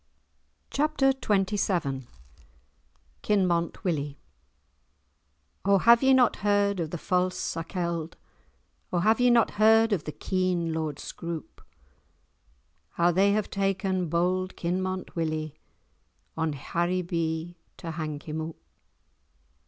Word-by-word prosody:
*Chapter 280 -2 +2
XXVII* 195 - 0 1.1
*Kinmont 180 -5 +1
Willie* 145 -5 -2 1.5
"O 200 0 +4
have 235 +4 +6
ye 265 0 +4
not 255 -3 +4
heard 205 -1 +1
of 165 -2 -2
the 175 - -4
false 180 +2 0
Sakelde, 170 -2 -3 0.8
O - - 0
have 220 +6 +3
ye 250 - +5
not 235 -2 +4
heard 225 0 +6
of 175 -7 -1
the 150 - -4
keen 180 -2 -1
Lord 155 -3 -3
Scroope, 170 -2 -7 1.3
How 175 +1 +3
they 195 +3 +3
have 215 -1 -1
taken 190 -2 0
bold 185 +3 0
Kinmont 185 +2 -3
Willie 155 -2 -2 0.8
On 160 -1 -1
Haribee 170 +1 -2 0.2
to 165 - -6
hang 155 -2 -4
him 160 -1 -5
oop?" 160 0 -7
180 Hz, 110 wpm, -27 LUFS, 165-200 Hz, 1.5 s, have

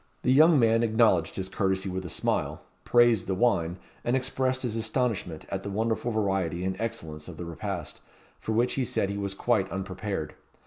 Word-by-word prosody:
The 130 - +4
young 155 +3 +7
man 115 -1 +4
acknowledged 110 -7 +3
his 95 -1 -3
courtesy 95 0 -1
with 95 0 -3
a - - -5
smile, - - -1 0.2
praised 120 -4 +4
the 95 - 0
wine, 90 -6 +1 0.3
and 120 - +1
expressed 130 0 0
his 115 -3 -2
astonishment 110 -7 -2
at 95 - -3
the 100 - -5
wonderful 110 +3 -1
variety 95 -5 0
and 95 0 -1
excellence 80 -10 -5
of 85 -3 -9
the 85 - -5
repast, 85 -2 -5 0.4
for - - -4
which 120 +3 +2
he 135 - 0
said 100 -4 -1
he 100 - -3
was 100 -1 -3
quite 100 -4 +1
unprepared. 95 -4 -4
100 Hz, 185 wpm, -28 LUFS, 95-115 Hz, 0.4 s, young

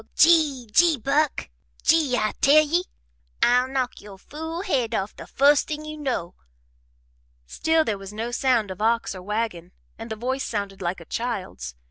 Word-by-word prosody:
Gee 305 -7 +4
Gee 335 -3 +5
Buck, 280 +5 0 0.4
Gee, 300 -6 +3
I 215 -2 0
tell 305 +2 +6
ye! 345 +4 0 0.6
I'll 250 +1 +4
knock 260 -2 -3
yo' 200 -2 -12
fool 320 - -6
head 250 - 0
off 195 0 -3
the - - -10
fust 285 +2 +3
thing 305 0 -5
you 305 0 -6
know!" 260 - -3 1.1
Still 320 - +1
there 205 -3 -2
was 195 0 -9
no 225 +3 -4
sound 240 -5 +1
of 185 - -8
ox 230 0 +1
or 185 - -9
wagon 195 -3 -3 0.3
and 225 +1 -7
the 220 - -3
voice 260 +4 -2
sounded 200 -3 -4
like 175 0 -3
a - - -12
child's. 190 - -4
245 Hz, 170 wpm, -24 LUFS, 210-295 Hz, 1.1 s, tell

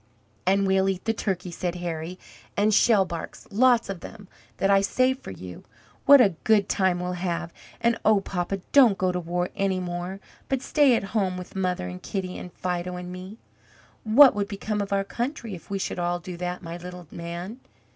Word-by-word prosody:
"And 195 +1 +3
we'll 190 0 +3
eat 190 -1 -3
the 225 - +2
turkey," 185 -5 -3
said 175 0 -3
Harry, 175 0 -4 0.4
"and 210 +1 +3
shellbarks, 190 -7 +2
lots 240 +2 +4
of 195 -2 -5
them, 205 +2 -11 0.3
that 195 - +2
I 195 0 +5
saved 255 +6 +1
for - - -9
you. 90 -1 -9 0.4
What 285 0 +10
a 200 -7 +5
good 210 -3 +4
time 185 -2 +1
we'll 180 0 -2
have! 175 -1 -3 0.3
And 235 0 +1
oh, 215 -2 +5
papa, 195 0 -3
don't 245 -8 +6
go 185 -1 +1
to 180 - -2
war 175 +1 -2
any 195 -1 0
more, 180 +1 -4 0.3
but 270 -1 -1
stay 285 -5 +4
at - - -1
home, 190 -4 +1
with 180 +1 -9
mother 180 - -1
and 90 0 -7
Kitty 185 -2 -4
and 180 - -8
Fido 180 0 -3
and 180 0 -6
me." 185 +4 -8 0.7
"What 255 +5 +8
would 205 -1 -1
become 210 +1 -3
of 200 - -4
our 195 0 +2
country 235 +1 -4
if 175 - -10
we 200 - -1
should 190 - -3
all 175 0 0
do 175 +1 -8
that, 180 +1 -4
my 170 0 -6
little 180 0 -9
man? 170 +7 -6
190 Hz, 195 wpm, -25 LUFS, 175-210 Hz, 0.7 s, What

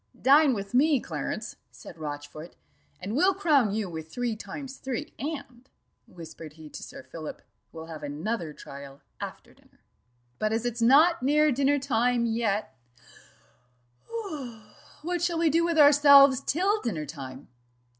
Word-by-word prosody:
"Dine 280 0 +5
with 200 0 -6
me, 280 +2 +4
Clarence," - - -5
said 170 - -13
Rochfort, 150 +2 -7 0.4
"and 195 +5 -5
we'll 370 +6 +3
crown 295 - +3
you 210 -1 -2
with 160 -2 -8
three 240 +1 -2
times 260 +6 -8
three; 270 +3 -5
and," 270 -4 -6 0.4
whispered 165 -6 -11
he 155 -1 -12
to - - -8
Sir - - -10
Philip, 160 -2 -9 0.3
"we'll 160 0 -9
have 160 -2 -9
another 155 +5 -4
trial 140 -1 -11 0.2
after - - -8
dinner." - - -28 0.6
"But 215 0 0
as 225 +1 -1
it's 240 -1 -3
not 300 +8 +5
near 300 +3 +3
dinner 275 +2 +2
time 245 -3 +1
yet 220 - -1 2.3
what 350 +1 -2
shall 345 -1 0
we 325 -2 +2
do 335 +3 +3
with 335 -1 0
ourselves 280 -2 +7
till 395 +7 +1
dinner 165 -10 -3
time?" 135 -2 -9
240 Hz, 145 wpm, -27 LUFS, -, 2.3 s, ourselves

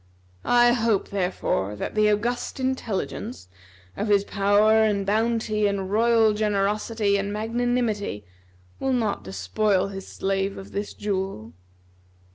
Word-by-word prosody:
I 240 0 +5
hope, 230 -4 +1
therefore, 180 - -1
that - - -5
the 215 0 +3
August 240 +5 -2
Intelligence, 245 - -3 0.5
of 210 - -2
his 200 -1 +4
power 205 +2 +3
and 205 -2 +1
bounty 215 0 +1
and 195 -1 -2
royal 225 0 +4
generosity 210 0 0
and 200 +1 -2
magnanimity, 220 - -1 0.5
will 265 - 0
not 220 - -1
despoil 185 - 0
his 195 -1 -8
slave 195 0 -2
of 195 - -10
this 205 +1 -4
jewel." 190 - -3
210 Hz, 120 wpm, -24 LUFS, 195-225 Hz, 0.5 s, I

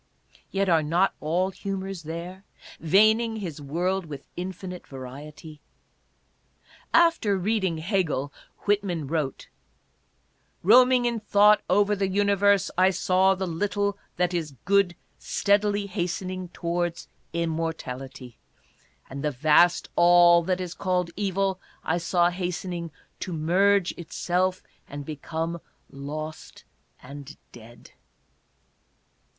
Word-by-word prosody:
Yet 195 0 0
are 165 -3 +4
not 170 +6 +1
all 180 +5 0
humors 195 -1 -5
there, 170 +4 -7 0.4
veining 220 +7 +3
his 170 -9 -6
world 175 +5 -2
with 145 -2 -8
" - - -43
infinite 185 -1 -8
variety 145 +4 -10 0.6
"? - - -43 0.6
''After 330 - +4
reading 190 -3 0
Hegel 160 -6 -1
" - - -40
Whitman 195 -6 0
wrote: 150 -2 -3 0.6
" - - -42
Roaming 250 +5 +6
in 235 -1 0
thought 210 0 +5
over 205 +2 +3
the 195 -1 0
Universe, 200 0 +2
I 185 +1 +6
saw 190 +1 +2
the 190 0 -3
little 200 +3 -1 0.2
that 180 0 +1
is 155 -5 -3
Good 200 -2 +3 0.2
steadily 205 0 +1
hastening 185 -1 -4
towards 170 0 -3 0.2
immortality, 140 -7 -4 0.7
And 140 +2 -7
the 150 - +1
vast 155 +5 +3
all 175 0 +6
that 185 0 0
is 180 -2 -4
called 180 -2 -1
Evil 195 -1 -1 0.2
I 175 - 0
saw 175 +1 +2
hastening 175 -1 -4 0.3
to 185 - -5
merge 180 +4 +2
itself 180 +2 -1 0.3
and 145 0 -7
be 155 - -5
come 165 +3 -4 0.3
lost 155 +3 -7 0.4
and 140 +2 -10
dead." 120 0 -15
180 Hz, 120 wpm, -26 LUFS, 160-195 Hz, 0.7 s, Roaming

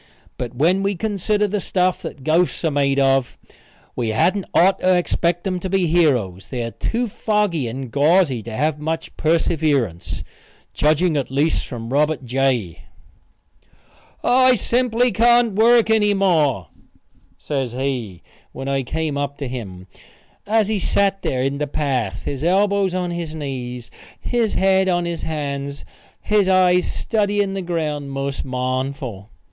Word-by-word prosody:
But 125 0 -5
when 170 +9 +2
we 200 0 0
consider 210 +1 0
the 205 +1 -2
stuff 185 -1 0
that 160 -6 -8
ghosts 165 +3 +1
are 160 - +2
made 140 -1 +1
of 135 -2 +2 0.6
we 115 -2 -1
hadn't 185 - +1
otter 185 0 +4
expect 175 0 0
them 185 -2 -2
to 190 - -4
be 190 -1 +1
heroes. 125 - +1
They 125 -2 -3
are 115 - -4
too 240 - -2
foggy 205 - 0
and 130 +1 -6
gauzy 145 -2 +3
to 115 - -8
have 150 +6 -1
much 160 +2 -4
perseverance 150 - 0 0.5
judging 155 +2 +2
at 135 - -2
least 145 +5 0
from 120 -1 -6
Robert 150 -1 +1
J. 125 -8 0 1.4
"I 255 +1 +5
simply 245 +1 +1
can't 235 -1 +4
work 225 +2 +4
any 210 -2 +3
more," 155 - +1 0.7
says 135 -5 -3
he, 125 -9 -3 0.3
when 135 - -6
I 135 0 0
came 150 +2 -3
up 140 0 -3
to 140 - -4
him, 100 -8 -7 0.6
as 215 -1 +2
he 215 -1 0
sat 195 +1 +1
there 130 -1 -1
in 135 +1 -1
the 150 - -1
path, 130 -9 -2
his 140 0 -4
elbows 195 +1 +2
on 180 -1 -2
his 170 -2 -5
knees, 125 -5 -6 0.3
his 235 -3 -1
head 190 0 +3
on 175 -1 +1
his 170 -1 -4
hands, 140 -2 -4 0.4
his 210 -2 +2
eyes 180 -1 +3
studying 205 -2 0
the 195 - -3
ground 155 -5 -3
most 135 0 -3
mournful. 130 -4 -3
155 Hz, 150 wpm, -20 LUFS, 135-190 Hz, 1.4 s, I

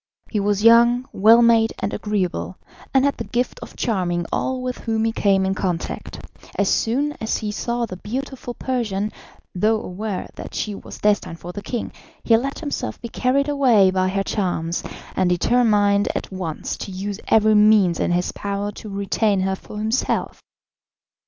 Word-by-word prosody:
He 215 - 0
was 205 0 0
young, 235 +2 +6
well 225 +4 +6
made 230 -1 +4
and - - -3
agreeable, 190 -3 -2 0.3
and 265 0 +4
had 280 - +1
the - - -3
gift 245 0 -2
of - - -10
charming 175 -6 -1
all 260 -1 -1
with 250 0 -3
whom 225 -1 -1
he 225 - +1
came 195 -3 +2
in 190 - +1
contact. 180 -4 -3 0.4
As 200 - +2
soon 275 +6 +1
as 220 - 0
he 210 -1 -3
saw 235 +3 -2
the 185 -5 -8
beautiful 250 +3 -5
Persian, 215 -5 -2 0.4
though 215 +4 +2
aware 195 +1 -4
that - - -9
she 210 - -2
was - - -9
destined 205 -5 0
for 175 - -7
the 205 - -7
king, 240 +3 -4 0.3
he 230 - +5
let 270 +5 -1
himself 295 -3 -4
be 235 - -7
carried 265 +4 +1
away 250 -10 +4
by 185 0 +1
her 195 +1 0
charms, 175 -5 -1 0.3
and 185 -1 +2
determined 205 +1 +3
at - - -4
once 180 -5 -4
to - - -6
use 195 +2 -4
every 220 0 +4
means 210 -5 +5
in - - +1
his 175 +1 0
power 200 0 -3
to 215 - -10
retain 200 0 0
her 190 0 0
for 210 - -11
himself. 220 +4 -1
210 Hz, 175 wpm, -22 LUFS, 190-235 Hz, 0.4 s, young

